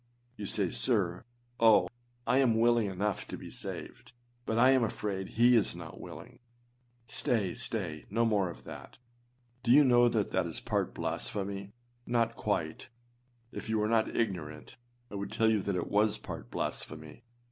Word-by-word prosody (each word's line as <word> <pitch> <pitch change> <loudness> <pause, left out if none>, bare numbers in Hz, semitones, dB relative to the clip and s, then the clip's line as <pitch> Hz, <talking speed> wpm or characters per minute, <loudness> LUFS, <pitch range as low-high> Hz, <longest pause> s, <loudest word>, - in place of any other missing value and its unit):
You 105 -4 -5
say, 100 -3 +2
âSir, 95 -8 +1 0.3
oh! 115 -2 +6 0.4
I 130 - +3
am 115 -5 +3
willing 120 -2 +4
enough 100 +1 -2
to - - -6
be - - -10
saved, - - -7 0.3
but 110 - 0
I 125 +3 +6
am 130 -2 +4
afraid 100 -3 -3
he 120 +2 +4
is 110 - +2
not - - -9
willing.â - - -10 0.7
Stay! 110 -4 +1
stay! 100 - -4
no 115 +3 +1
more 100 -5 +2
of 85 - -10
that! - - -10 0.6
Do 120 - -4
you 145 +5 +8
know 120 -2 +5
that 110 -3 -1
is 80 - -5
part - - -2
blasphemy 100 -1 -3
â 100 - -17 0.4
not 115 -1 +1
quite. 80 -8 -2 0.6
If - - -7
you 110 - +1
were 105 0 +1
not 115 0 +1
ignorant, 85 -9 -3 0.4
I - - -10
would 100 - -5
tell 110 0 +3
you 110 -2 +2
that 100 0 -2
it 90 - -1
was 105 +1 +2
part - - -8
blasphemy. 80 +7 -5
110 Hz, 170 wpm, -31 LUFS, 95-115 Hz, 0.7 s, you